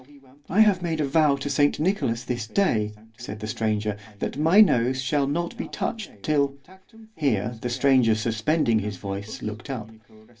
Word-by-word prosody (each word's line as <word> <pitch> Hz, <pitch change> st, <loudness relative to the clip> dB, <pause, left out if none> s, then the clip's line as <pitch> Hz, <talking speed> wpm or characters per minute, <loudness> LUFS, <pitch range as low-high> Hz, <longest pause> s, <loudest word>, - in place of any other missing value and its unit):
I 200 Hz, +5 st, +4 dB
have 205 Hz, -4 st, +4 dB
made 165 Hz, -2 st, -2 dB
a 150 Hz, -, +1 dB
vow 150 Hz, 0 st, +3 dB
to 140 Hz, +1 st, -5 dB
saint 145 Hz, +1 st, +2 dB
Nicolas 155 Hz, -, 0 dB
this 120 Hz, -3 st, -3 dB
day, 110 Hz, -, +1 dB, 0.3 s
said 110 Hz, -3 st, -7 dB
the 105 Hz, -, -5 dB
stranger, 110 Hz, -1 st, -1 dB, 0.2 s
that -, -, -3 dB
my 160 Hz, +7 st, +4 dB
nose 130 Hz, -, +4 dB
shall 135 Hz, +1 st, 0 dB
not 170 Hz, +4 st, -2 dB
be -, -, -4 dB
touched 210 Hz, -, -5 dB
till—Here 145 Hz, -, -2 dB
the 125 Hz, -, -2 dB
stranger 125 Hz, -2 st, +3 dB
suspending 115 Hz, +3 st, +1 dB
his 105 Hz, -2 st, -4 dB
voice, 100 Hz, +2 st, -6 dB
looked 110 Hz, +4 st, -6 dB
up. 115 Hz, -5 st, -5 dB
130 Hz, 160 wpm, -25 LUFS, 110-160 Hz, 0.3 s, I